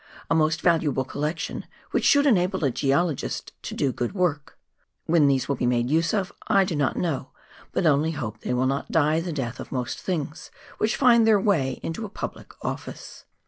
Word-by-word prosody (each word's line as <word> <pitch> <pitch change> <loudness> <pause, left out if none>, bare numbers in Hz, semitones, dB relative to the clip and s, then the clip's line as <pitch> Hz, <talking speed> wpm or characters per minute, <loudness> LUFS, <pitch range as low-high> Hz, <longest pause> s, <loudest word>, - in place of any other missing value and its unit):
A - - +6
most 160 0 +2
valuable 155 -6 +2
collection, 150 +5 -4 0.2
which - - 0
should 285 0 +5
enable 190 - +2
a 135 - +2
geologist 145 +4 -1
to - - -6
do 135 - +1
good 120 - -3
work. 170 -7 -1 0.5
When 160 -3 +4
these 135 -2 +2
will 140 - -1
be 125 - 0
made 120 +1 +1
use 165 +2 +2
of 200 -2 -1 0.2
I 195 - +4
do 180 - -3
not 145 -3 0
know, 145 -7 -2 0.4
but 185 - 0
only 155 0 +3
hope 110 -7 -5
they 125 - -2
will 125 +1 +1
not 135 +1 -1
die 155 0 +3
the 170 +1 -4
death 130 -5 -4
of - - -8
most 125 -2 -3
things 155 -5 -4 0.3
which 215 +1 +1
find 235 -4 +5
their 215 -2 +5
way 155 - +1
into 165 +7 -4
a 215 - -5
public - - -7
ofiice. - - -6
155 Hz, 195 wpm, -25 LUFS, 135-180 Hz, 0.5 s, A